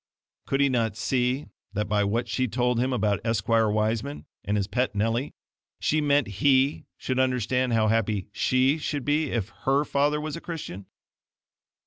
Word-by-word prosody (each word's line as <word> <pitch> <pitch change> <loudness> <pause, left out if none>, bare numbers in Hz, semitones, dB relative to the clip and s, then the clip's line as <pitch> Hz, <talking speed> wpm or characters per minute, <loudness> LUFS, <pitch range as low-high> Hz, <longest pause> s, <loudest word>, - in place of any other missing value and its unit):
Could 135 +1 +1
he 140 - +5
not 115 -5 0
see 125 +3 0 0.3
that 105 +1 -1
by 105 0 +2
what 110 +4 0
she 130 - 0
had 115 - -7
told 125 -1 +1
him 130 +2 +1
about 105 -5 +1
Esquire 115 0 +2
Wiseman 110 +6 -1 0.2
and 105 0 0
his 100 - 0
pet 115 +4 -1
Nellie, 115 +6 -1 0.4
she 155 0 +1
meant 145 -3 +2
HE 135 0 +3
should 130 0 -2
understand 125 -1 +1
how 110 -1 +3
happy 110 -3 0
SHE 130 +8 +2
should 145 -3 -3
be 150 +1 +1
if 115 -5 -2 0.2
HER 140 +2 +3
father 145 +2 +1
was 155 0 -4
a 165 - -7
Christian? 145 - -7
125 Hz, 170 wpm, -26 LUFS, 110-140 Hz, 0.4 s, he